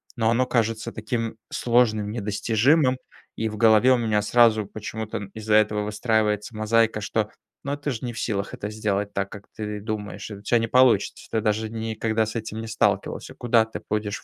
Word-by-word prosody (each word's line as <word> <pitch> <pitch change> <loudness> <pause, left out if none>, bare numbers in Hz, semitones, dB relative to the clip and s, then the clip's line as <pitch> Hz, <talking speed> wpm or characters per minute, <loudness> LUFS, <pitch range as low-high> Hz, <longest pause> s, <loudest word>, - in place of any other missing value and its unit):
но 115 -2 +1
оно 125 +2 +2
кажется 115 -1 0
таким 115 0 -3
сложным, 110 -4 +2
недостижимым, 120 +6 +2 0.4
и 110 0 -1
в 105 - -7
голове 110 +3 +5
у - - +3
меня 110 -3 +1
сразу 110 -2 +4
почему-то 110 +1 -5
н 100 -1 -7
из-за 110 -1 0
этого 105 -1 +3
выстраивается 105 0 0
мозаика, 110 0 +2
что 105 +1 -1 0.3
"ну 140 +1 -2
ты 145 0 -4
же 125 -1 -4
не 120 - -4
в - - -6
силах 100 -3 -2
это 105 - -5
сделать 105 -1 -2
так, 100 0 -2
как 100 -1 -10
ты 105 -2 -5
думаешь, 105 0 -5
и 105 - -7
у 100 - -12
тя 120 +2 +3
не 115 - -1
получится, 125 -4 +3
ты 110 - 0
даже 110 0 0
ни 115 0 -4
никогда 110 0 0
с 110 - -6
этим 110 0 -4
не 115 - -6
сталкивался, 110 0 -1
куда 115 -2 +2
ты 110 - -8
будешь 105 -1 -2
110 Hz, 200 wpm, -24 LUFS, 105-115 Hz, 0.4 s, голове